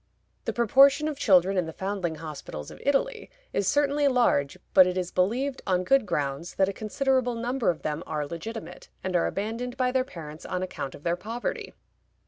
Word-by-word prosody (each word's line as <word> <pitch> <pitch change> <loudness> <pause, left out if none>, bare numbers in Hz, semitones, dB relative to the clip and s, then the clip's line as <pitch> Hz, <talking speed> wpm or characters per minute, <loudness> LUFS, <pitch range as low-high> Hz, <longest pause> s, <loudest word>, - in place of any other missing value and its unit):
The - - 0
proportion 275 +6 +5
of 295 -2 -4
children 190 -4 +4
in 170 - -1
the - - -5
foundling 190 -3 -2
hospitals 150 - -7
of - - -12
Italy 430 - 0 0.2
is 200 - 0
certainly 290 +2 +3
large, 240 - +2 0.2
but 185 -2 +8
it 180 0 -2
is 180 -1 -2
believed, 250 +9 0
on 185 -1 +2
good 270 +2 +3
grounds, 145 +1 -2
that 190 - +3
a 195 - -2
considerable 250 +3 0
number 240 +1 0
of 170 - -2
them 150 +1 -2
are 150 -2 -2
legitimate, 175 +3 -7
and 185 -1 -2
are 170 - +3
abandoned 230 +5 -3
by 255 -1 +1
their 260 0 +2
parents 160 - -9
on 185 -1 -3
account 140 -7 -5
of 145 - -14
their 170 0 +1
poverty. 225 +6 -5
195 Hz, 190 wpm, -27 LUFS, 170-255 Hz, 0.2 s, but